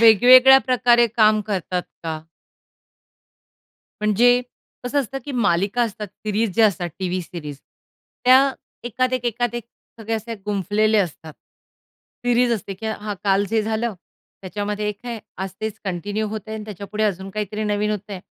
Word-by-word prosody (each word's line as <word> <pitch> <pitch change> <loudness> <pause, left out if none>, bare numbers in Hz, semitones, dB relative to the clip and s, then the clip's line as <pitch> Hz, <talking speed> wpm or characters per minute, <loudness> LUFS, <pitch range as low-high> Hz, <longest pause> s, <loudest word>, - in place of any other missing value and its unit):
वेगवेगळ्या 250 +4 +8
प्रकारे 240 -1 +4
काम 215 -1 +3
करतात 185 -3 -2 0.2
का? 160 -1 -3 1.8
म्हणजे 235 +4 +4 0.4
कसं 285 +4 0
असतं 270 +1 -5
की 290 - -6
मालिका 200 0 +1
असतात, 215 -2 -3
सीरीज 210 +2 -2
ज्या 225 -1 +6
असतात 180 -4 -2
टीव्ही 185 -1 -2
सीरीज 150 -3 -8 0.7
त्या 265 +2 +6 0.3
एकात 255 +2 -1
एक, 255 -1 -1
एकात 240 0 -1
एक 240 -2 -4 0.4
सगळे 225 +1 -2
असे 225 +1 -4
गुंफलेले 210 +2 +1
असतात. 160 -4 -3 0.9
सीरीज 245 0 +3
असते, 200 -3 -3
की 220 +4 -7
हां 210 -1 -4
काल 195 0 +3
जे 225 -1 +2
झालं 220 +1 -2 0.5
त्याच्यामध्ये 205 +2 -3
एक 205 -1 -4
आहे. 235 -2 -4 0.2
आज 190 +1 -3
तेच 220 0 -4
कंटिन्यू 200 +4 -2
होतंय 220 +1 -6
आणि 215 -1 -6
त्याच्यापुढे 210 +1 -4
अजून 195 -2 -2
काहीतरी 210 +1 -3
नवीन 210 0 0
होतंय. 205 -2 -5
215 Hz, 145 wpm, -22 LUFS, 200-235 Hz, 1.8 s, वेगवेगळ्या